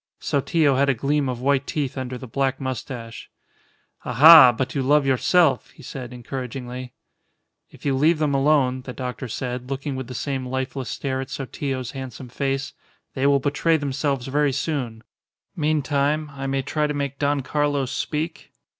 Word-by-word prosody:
Sotillo 140 Hz, 0 st, +1 dB
had 140 Hz, +1 st, +3 dB
a 135 Hz, -, +3 dB
gleam 140 Hz, +3 st, 0 dB
of 125 Hz, -1 st, -4 dB
white 140 Hz, +1 st, +1 dB
teeth 145 Hz, -4 st, -2 dB
under 130 Hz, -1 st, -4 dB
the 130 Hz, -, -9 dB
black 135 Hz, +2 st, -1 dB
moustache. 125 Hz, -3 st, -6 dB, 0.7 s
"Aha! 155 Hz, -3 st, +9 dB
But 125 Hz, +2 st, -3 dB
you 140 Hz, -, 0 dB
love 145 Hz, +2 st, +3 dB
yourself," 140 Hz, +4 st, +3 dB
he 150 Hz, -, -16 dB
said, 125 Hz, -1 st, -7 dB
encouragingly. 125 Hz, 0 st, -6 dB, 0.8 s
"If -, -, -17 dB
you 140 Hz, -, +2 dB
leave 155 Hz, +5 st, +3 dB
them 150 Hz, -2 st, 0 dB
alone," 135 Hz, -2 st, +2 dB
the 125 Hz, 0 st, -8 dB
doctor 125 Hz, 0 st, -5 dB
said, 125 Hz, +2 st, -4 dB
looking 135 Hz, +1 st, -3 dB
with 130 Hz, -2 st, -5 dB
the 125 Hz, -, -7 dB
same 130 Hz, +1 st, -3 dB
lifeless 130 Hz, 0 st, -3 dB
stare 130 Hz, -1 st, -2 dB
at 135 Hz, -, -7 dB
Sotillo's 135 Hz, -2 st, -4 dB
handsome 130 Hz, -2 st, -8 dB
face, 135 Hz, +2 st, -2 dB, 0.4 s
"they 135 Hz, 0 st, +1 dB
will 140 Hz, 0 st, +4 dB
betray 145 Hz, +4 st, +1 dB
themselves 140 Hz, -2 st, -2 dB
very 145 Hz, +1 st, +1 dB
soon. 130 Hz, -6 st, -3 dB, 0.5 s
Meantime, 150 Hz, -1 st, 0 dB
I 135 Hz, 0 st, -5 dB
may 135 Hz, 0 st, -1 dB
try 150 Hz, +2 st, 0 dB
to 150 Hz, -, -3 dB
make 140 Hz, -1 st, -3 dB
Don 145 Hz, 0 st, +1 dB
Carlos 145 Hz, -1 st, 0 dB
speak?" 160 Hz, +2 st, -3 dB
135 Hz, 165 wpm, -23 LUFS, 130-145 Hz, 0.8 s, Aha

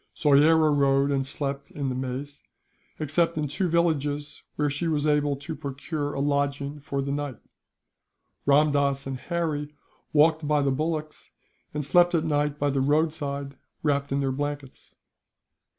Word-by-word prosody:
Soyera 155 Hz, +2 st, +5 dB
rode 140 Hz, 0 st, +3 dB
and 135 Hz, -1 st, 0 dB
slept 140 Hz, 0 st, -4 dB
on 140 Hz, -2 st, -1 dB
the -, -, -2 dB
maize, 130 Hz, +3 st, -5 dB, 0.6 s
except 160 Hz, +2 st, +1 dB
in 150 Hz, -1 st, 0 dB
two 175 Hz, +6 st, -1 dB
villages, 150 Hz, -3 st, 0 dB
where 150 Hz, -, +1 dB
she 145 Hz, +4 st, -2 dB
was 150 Hz, -2 st, 0 dB
able 145 Hz, -1 st, +2 dB
to 140 Hz, +3 st, -6 dB
procure 145 Hz, +1 st, -4 dB
a -, -, -2 dB
lodging 140 Hz, 0 st, -1 dB
for 140 Hz, -1 st, -3 dB
the 140 Hz, -, -3 dB
night. 145 Hz, -3 st, -3 dB, 1.1 s
Ramdass 140 Hz, -1 st, +3 dB
and 135 Hz, -1 st, -4 dB
Harry 150 Hz, -3 st, -3 dB, 0.4 s
walked 155 Hz, 0 st, +3 dB
by 150 Hz, -1 st, +2 dB
the 140 Hz, -, +2 dB
bullocks, 155 Hz, +2 st, -3 dB, 0.4 s
and 150 Hz, -1 st, -3 dB
slept 175 Hz, +5 st, +4 dB
at 160 Hz, -1 st, +1 dB
night 150 Hz, -1 st, 0 dB
by 145 Hz, -1 st, +1 dB
the 135 Hz, -1 st, 0 dB
roadside, 145 Hz, -2 st, 0 dB, 0.3 s
wrapped 140 Hz, -2 st, 0 dB
in 140 Hz, +1 st, +1 dB
their 135 Hz, -1 st, 0 dB
blankets. 145 Hz, 0 st, -5 dB
145 Hz, 150 wpm, -26 LUFS, 140-155 Hz, 1.1 s, Soyera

